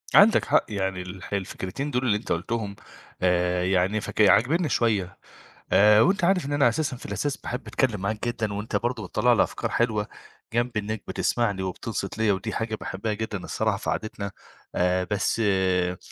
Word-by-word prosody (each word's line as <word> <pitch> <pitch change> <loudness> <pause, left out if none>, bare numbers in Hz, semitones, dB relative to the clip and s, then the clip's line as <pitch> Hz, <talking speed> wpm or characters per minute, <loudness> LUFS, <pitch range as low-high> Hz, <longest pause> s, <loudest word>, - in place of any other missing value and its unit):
عندك 215 +3 +7
حق، - - +3
يعني 95 -3 -2
الح 95 +2 -8
الفكرتين 100 +7 -3
دول 125 0 0
اللي 105 -3 +3
أنت 105 - -7
قُلتهم 100 +3 -2 0.5
آآ، 90 0 +2
يعني 95 +3 +1
فك 110 - -2
عاجبيني 150 - +4
شوية 105 -8 0 0.5
آآ، 105 +1 +6
وأنت 190 - +2
عارف 180 -4 +3
إن 145 - -3
أنا 140 -4 +4
أساسًا 130 +1 -2
في - - -12
الأساس 145 -1 -2
باحب 125 +3 -6
أتكلم 115 -7 0
معاك 105 +4 -2
جدًا، 110 -3 -2
وأنت 105 +2 -4
برضو 115 -4 -1
بتطلّع - - +3
لي - - +4
أفكار - - -4
حلوة 110 -3 +1 0.5
جنب 120 0 0
إنك 105 0 -3
بتسمعني 105 -5 0
وبتنصت 100 +2 -4
ليّا، 110 -2 +3
ودي 100 +3 -4
حاجة 115 -1 -2
باحبها 105 +1 -4
جدًا 110 -1 -3
الصراحة 110 -2 -1
في - - -4
قعدتنا 100 -2 -3 0.4
آآ، 90 +1 +2
بس 100 +2 0
آآ، 95 -2 +1
105 Hz, 175 wpm, -25 LUFS, 95-120 Hz, 0.5 s, عندك